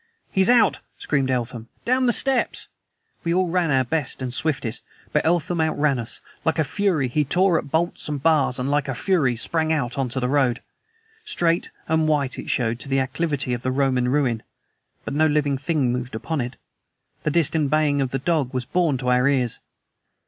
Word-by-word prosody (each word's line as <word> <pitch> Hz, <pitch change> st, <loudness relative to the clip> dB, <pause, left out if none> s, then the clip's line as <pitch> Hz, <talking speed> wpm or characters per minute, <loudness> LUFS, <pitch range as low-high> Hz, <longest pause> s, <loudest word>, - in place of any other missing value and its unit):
"He's 190 Hz, +2 st, +3 dB
out!" 245 Hz, -2 st, +4 dB, 0.2 s
screamed 135 Hz, -3 st, 0 dB
Eltham. 120 Hz, -2 st, -2 dB, 0.2 s
"Down 255 Hz, +1 st, +2 dB
the -, -, +5 dB
steps!" 265 Hz, +1 st, +1 dB, 0.5 s
We 170 Hz, 0 st, 0 dB
all 185 Hz, -1 st, +2 dB
ran 175 Hz, -1 st, +1 dB
our 135 Hz, -2 st, +3 dB
best 140 Hz, +2 st, -1 dB
and 130 Hz, -2 st, -4 dB
swiftest. 135 Hz, -6 st, -1 dB, 0.3 s
But 150 Hz, -, +2 dB
Eltham 170 Hz, 0 st, +1 dB
outran 150 Hz, -4 st, +1 dB
us. 115 Hz, -, -3 dB, 0.2 s
Like 160 Hz, 0 st, +1 dB
a 160 Hz, -, +3 dB
fury 175 Hz, -5 st, 0 dB
he 150 Hz, +5 st, +1 dB
tore 175 Hz, +3 st, +2 dB
at -, -, -8 dB
bolts 160 Hz, +1 st, -1 dB
and 145 Hz, -1 st, -2 dB
bars, 150 Hz, -6 st, +3 dB
and 125 Hz, -, -1 dB
like 145 Hz, 0 st, +1 dB
a 135 Hz, -, -2 dB
fury 155 Hz, -7 st, +1 dB
sprang 160 Hz, +6 st, -1 dB
out 140 Hz, -5 st, -1 dB
into 130 Hz, 0 st, -1 dB
the 125 Hz, -, 0 dB
road. 130 Hz, -3 st, +1 dB, 0.6 s
Straight 175 Hz, -, +1 dB, 0.2 s
and 160 Hz, 0 st, +2 dB
white 145 Hz, -4 st, 0 dB
it -, -, -7 dB
showed 120 Hz, -1 st, 0 dB
to 135 Hz, -, -8 dB
the 135 Hz, 0 st, +2 dB
acclivity 135 Hz, -1 st, -1 dB
by 120 Hz, -, -7 dB
the 130 Hz, -, -1 dB
Roman 130 Hz, -2 st, +1 dB
ruin. 125 Hz, -5 st, +1 dB, 0.6 s
But -, -, -4 dB
no 155 Hz, +2 st, +3 dB
living 145 Hz, -2 st, +1 dB
thing 145 Hz, -4 st, 0 dB
moved 125 Hz, -1 st, -4 dB
upon 150 Hz, +6 st, -2 dB
it. 120 Hz, +1 st, -5 dB, 0.7 s
The -, -, 0 dB
distant 155 Hz, -2 st, +2 dB
baying 150 Hz, -2 st, +2 dB
of 135 Hz, -, 0 dB
the 135 Hz, -, -2 dB
dog 140 Hz, -2 st, -1 dB
was 125 Hz, -1 st, -1 dB
borne 165 Hz, -2 st, +1 dB
to 125 Hz, 0 st, -2 dB
our 125 Hz, +1 st, +3 dB
ears. 130 Hz, -5 st, +1 dB
145 Hz, 195 wpm, -23 LUFS, 130-160 Hz, 0.7 s, the